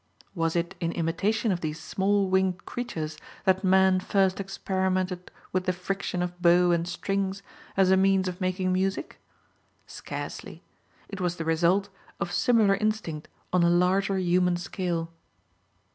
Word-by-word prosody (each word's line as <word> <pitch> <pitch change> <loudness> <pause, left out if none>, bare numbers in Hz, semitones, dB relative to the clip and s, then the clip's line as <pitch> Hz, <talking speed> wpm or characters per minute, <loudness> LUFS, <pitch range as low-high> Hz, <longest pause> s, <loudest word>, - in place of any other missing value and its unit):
Was 165 -2 -1
it 170 0 -1
in 165 -1 -1
imitation 200 +7 0
of 175 -2 -2
these 155 0 -3
small 200 0 +1
winged 190 -1 +1
creatures 160 -11 -5 0.3
that 190 +1 +3
man 190 0 +4
first 190 0 +1
experimented 185 -1 -2 0.2
with 185 0 -1
the 185 - +1
friction 180 0 -3
of 180 0 -6
bow 175 0 +5
and 170 0 +1
strings 195 +1 -2 0.3
as 190 -1 +4
a 190 - +5
means 190 0 +3
of 180 +1 -5
making 185 0 0
music? 190 +1 -2 0.6
Scarcely. - - -7 0.4
It 200 -2 -7
was 175 -1 0
the 165 - -5
result 175 +5 +2 0.3
of 195 -3 -2
similar 230 -5 +3
instinct 200 -7 -2 0.3
on 180 - +4
a 170 - +4
larger 190 +3 +2
human 180 -1 +2
scale. 175 -2 -3
185 Hz, 145 wpm, -27 LUFS, 175-195 Hz, 0.6 s, bow